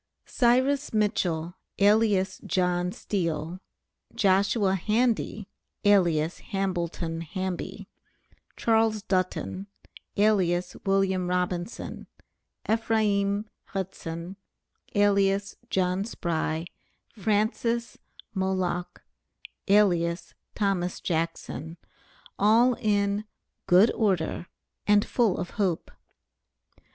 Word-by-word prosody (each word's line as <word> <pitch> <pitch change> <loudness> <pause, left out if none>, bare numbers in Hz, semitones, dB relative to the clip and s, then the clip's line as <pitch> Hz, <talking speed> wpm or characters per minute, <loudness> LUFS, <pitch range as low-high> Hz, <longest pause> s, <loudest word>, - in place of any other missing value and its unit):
CYRUS 260 +2 +2
MITCHELL, 175 -6 0 0.2
alias 200 -2 +3
JOHN 180 0 0
STEEL; 170 -3 -3 0.6
JOSHUA 195 0 +3
HANDY, 215 0 0 0.4
alias 170 -5 +3
HAMBLETON 175 -4 -3
HAMBY; 190 +3 -5 0.7
CHARLES 225 -2 +2
DULTON, 185 0 -2 0.5
alias 185 -4 +2
WILLIAM 190 -2 +2
ROBINSON; 180 +2 -3 0.6
EPHRAIM 210 -2 +1 0.2
HUDSON, 185 -2 -5 0.6
alias 200 -1 +2
JOHN 185 +1 0
SPRY; 165 -5 -2 0.5
FRANCIS 220 +3 0 0.3
MOLOCK, 185 -2 -2 0.6
alias 175 -4 +2 0.2
THOMAS 190 -4 0
JACKSON; 165 -1 -3 0.6
all 230 +5 +5
in 205 -1 +1 0.4
"good 185 +6 +6
order" 185 -5 0 0.4
and 205 0 +5
full 225 -7 +1
of 175 - -4
hope. 190 -6 -1
195 Hz, 75 wpm, -27 LUFS, 175-210 Hz, 0.7 s, good